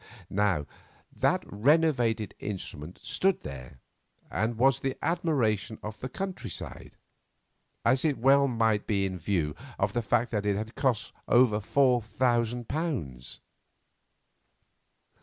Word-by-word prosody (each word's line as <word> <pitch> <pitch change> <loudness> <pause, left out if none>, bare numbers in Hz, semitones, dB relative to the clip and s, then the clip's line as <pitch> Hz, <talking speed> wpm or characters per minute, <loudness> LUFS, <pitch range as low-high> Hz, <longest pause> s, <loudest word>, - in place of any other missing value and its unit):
Now 95 -7 +1 0.5
that - - +2
renovated 120 -3 +2
instrument 90 -5 -6
stood 195 -1 +1
there, 65 -2 -8 0.5
and 110 +1 -1
was 130 +2 +4
the 135 -1 -2
admiration 125 - 0
of 105 0 -6
the 130 - -5
country 185 - -5
side, - - -7 0.9
as 130 +2 +3
it 150 -4 +1
well 140 +3 +5
might 115 -4 +1
be 100 -2 +1
in 95 -1 -3
view 80 -4 -1 0.2
of 95 +1 0
the 120 - +1
fact 120 +2 +1
that 105 -2 -1
it 100 - +2
had 110 +2 -5
cost 130 -6 0
over 120 -4 +5
four 125 +3 +3
thousand 120 +1 0
pounds. 110 - -3
115 Hz, 125 wpm, -28 LUFS, 100-130 Hz, 0.9 s, well